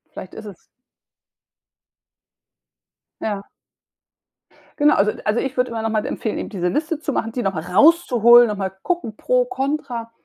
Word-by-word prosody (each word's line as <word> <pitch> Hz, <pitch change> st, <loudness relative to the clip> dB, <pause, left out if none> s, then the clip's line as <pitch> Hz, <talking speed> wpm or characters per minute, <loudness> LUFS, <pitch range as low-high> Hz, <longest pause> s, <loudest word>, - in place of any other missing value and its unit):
Vielleicht 185 Hz, -, -9 dB
ist 220 Hz, -, -10 dB
es 200 Hz, -4 st, -11 dB, 2.6 s
Ja. 205 Hz, -2 st, -4 dB, 1.3 s
Genau, 295 Hz, +1 st, +4 dB
also 210 Hz, +2 st, +2 dB
also 215 Hz, +2 st, 0 dB
ich 265 Hz, -1 st, -3 dB
würde 250 Hz, 0 st, 0 dB
immer 230 Hz, -1 st, -4 dB
noch 225 Hz, -, -1 dB
mal 215 Hz, -1 st, -1 dB
empfehlen, 220 Hz, -, -3 dB
eben -, -, -5 dB
diese 180 Hz, -4 st, -2 dB
Liste 305 Hz, -, -2 dB
zu 300 Hz, -3 st, -3 dB
machen, 225 Hz, -2 st, -2 dB
die 245 Hz, +1 st, -3 dB
noch 195 Hz, -1 st, -1 dB
mal 160 Hz, -3 st, -4 dB
rauszuholen, 240 Hz, -, +5 dB
noch 210 Hz, -2 st, -3 dB
mal 190 Hz, -1 st, -3 dB
gucken 345 Hz, -, -2 dB
pro, -, -, +1 dB
contra, 265 Hz, -, -4 dB
230 Hz, 160 wpm, -21 LUFS, 210-285 Hz, 2.6 s, rauszuholen